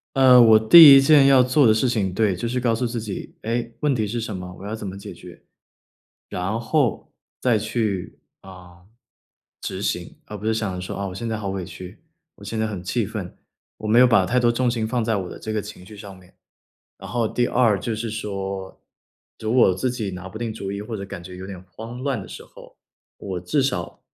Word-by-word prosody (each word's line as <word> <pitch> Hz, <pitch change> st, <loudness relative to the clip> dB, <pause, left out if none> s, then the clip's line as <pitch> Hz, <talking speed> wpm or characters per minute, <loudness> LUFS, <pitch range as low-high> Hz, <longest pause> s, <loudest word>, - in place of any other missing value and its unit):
呃， 130 Hz, -2 st, +7 dB
我 110 Hz, -2 st, +7 dB
第 145 Hz, +5 st, +10 dB
一 135 Hz, -, +7 dB
件 140 Hz, 0 st, +6 dB
要 135 Hz, -1 st, +6 dB
做 130 Hz, +3 st, +3 dB
的 110 Hz, -, +6 dB
事 110 Hz, +3 st, +1 dB
情 100 Hz, -6 st, -1 dB
对， 100 Hz, -2 st, +1 dB
就 115 Hz, +7 st, -4 dB
是 125 Hz, +1 st, -2 dB
告 120 Hz, -2 st, +1 dB
诉 125 Hz, +2 st, -2 dB
自 115 Hz, -1 st, -3 dB
己 105 Hz, -3 st, -7 dB
“哎， 115 Hz, +1 st, -3 dB
问 145 Hz, -3 st, +1 dB
题 110 Hz, -3 st, 0 dB
是 115 Hz, +3 st, -3 dB
什 110 Hz, -3 st, -5 dB
么？ 90 Hz, 0 st, -8 dB
我 -, -, -11 dB
要 105 Hz, +2 st, -4 dB
怎 105 Hz, -3 st, -7 dB
么 95 Hz, -, -6 dB
解 100 Hz, -, -9 dB
决？” -, -, -13 dB, 0.9 s
然 95 Hz, +6 st, -3 dB
后， 130 Hz, -2 st, -1 dB, 0.3 s
再 120 Hz, -4 st, +2 dB
去， 105 Hz, -4 st, -3 dB, 0.2 s
啊， 90 Hz, -2 st, -14 dB, 1.2 s
执 -, -, -12 dB
行， -, -, -23 dB
而 105 Hz, -, -8 dB
不 105 Hz, -, -7 dB
是 110 Hz, -, +1 dB
想 105 Hz, -4 st, -2 dB
着 -, -, -5 dB
说 90 Hz, -, -6 dB
啊 100 Hz, -, -3 dB
我 90 Hz, -, -7 dB
现 115 Hz, +4 st, -5 dB
在 110 Hz, -, -2 dB
好 100 Hz, -2 st, -5 dB
委 95 Hz, -1 st, -4 dB
屈， 90 Hz, +4 st, -11 dB, 0.4 s
我 100 Hz, -, -14 dB
现 110 Hz, +2 st, -4 dB
在 -, -, +1 dB
很 100 Hz, -4 st, -5 dB
气 90 Hz, -, -1 dB
愤。 -, -, -7 dB, 0.4 s
我 110 Hz, -, -6 dB
没 115 Hz, +3 st, +4 dB
有 125 Hz, -, +8 dB
把 115 Hz, -6 st, +4 dB
太 125 Hz, +6 st, 0 dB
多 120 Hz, -1 st, +3 dB
重 125 Hz, +1 st, +1 dB
心 115 Hz, -2 st, -2 dB
放 120 Hz, 0 st, -1 dB
在 110 Hz, -1 st, 0 dB
我 95 Hz, -2 st, -4 dB
的 -, -, -9 dB
这 110 Hz, -, -5 dB
个 110 Hz, -, -1 dB
情 100 Hz, -3 st, -11 dB
绪 105 Hz, +2 st, -13 dB
上 100 Hz, -1 st, -11 dB
面。 90 Hz, -1 st, -20 dB, 0.7 s
然 -, -, -10 dB
后 120 Hz, -2 st, 0 dB
第 120 Hz, +2 st, 0 dB
二 115 Hz, -5 st, +2 dB
就 115 Hz, -, -3 dB
是 110 Hz, +1 st, -4 dB
说， 100 Hz, -3 st, -6 dB, 0.6 s
如 110 Hz, +1 st, -2 dB
果 125 Hz, -, +5 dB
我 90 Hz, -, 0 dB
自 125 Hz, +6 st, -1 dB
己 110 Hz, -5 st, -4 dB
拿 90 Hz, +1 st, -8 dB
不 110 Hz, +4 st, -9 dB
定 115 Hz, -1 st, -3 dB
主 100 Hz, -3 st, -6 dB
意 100 Hz, -, -5 dB
或 110 Hz, +1 st, -6 dB
者 100 Hz, -, -6 dB
感 85 Hz, -3 st, -9 dB
觉 90 Hz, 0 st, -10 dB
有 95 Hz, -, -8 dB
点 95 Hz, -2 st, -9 dB
慌 115 Hz, +7 st, -9 dB
乱 135 Hz, -3 st, -2 dB
的 -, -, -10 dB
时 -, -, -10 dB
候， -, -, -16 dB, 0.4 s
我 95 Hz, -3 st, -5 dB
至 115 Hz, -, 0 dB
少 100 Hz, -11 st, -3 dB
110 Hz, 260 characters per minute, -22 LUFS, 95-120 Hz, 1.2 s, 第